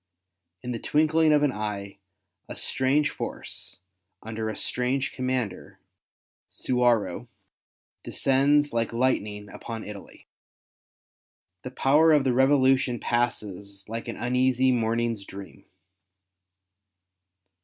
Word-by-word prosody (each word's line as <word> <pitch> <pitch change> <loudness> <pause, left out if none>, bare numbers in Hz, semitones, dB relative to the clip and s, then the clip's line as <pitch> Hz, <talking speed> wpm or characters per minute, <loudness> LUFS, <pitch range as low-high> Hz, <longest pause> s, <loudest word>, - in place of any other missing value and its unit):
In 125 - -4
the 115 - -3
twinkling 155 +3 +3
of 150 -1 +4
an 145 - +3
eye, 105 -3 -5 0.5
a - - -6
strange 140 +3 +1
force, - - -7 0.5
under 110 0 -4
a 110 - -5
strange 130 +2 -1
commander, 130 -7 -3 0.7
Suwarrow, 120 -7 0 0.8
descends 145 +2 +2
like 115 0 -1
lightning 105 -4 0
upon 115 -2 -7
Italy. 105 -2 -11 1.4
The - - -6
power 150 +5 +4
of 145 -2 +4
the 130 -2 +1
Revolution 130 -2 +3
passes 100 -5 -3
like 115 +1 -5
an - - -5
uneasy 130 +1 +2
morning's 115 -2 0
dream. 100 0 -11
125 Hz, 100 wpm, -26 LUFS, 110-135 Hz, 1.4 s, of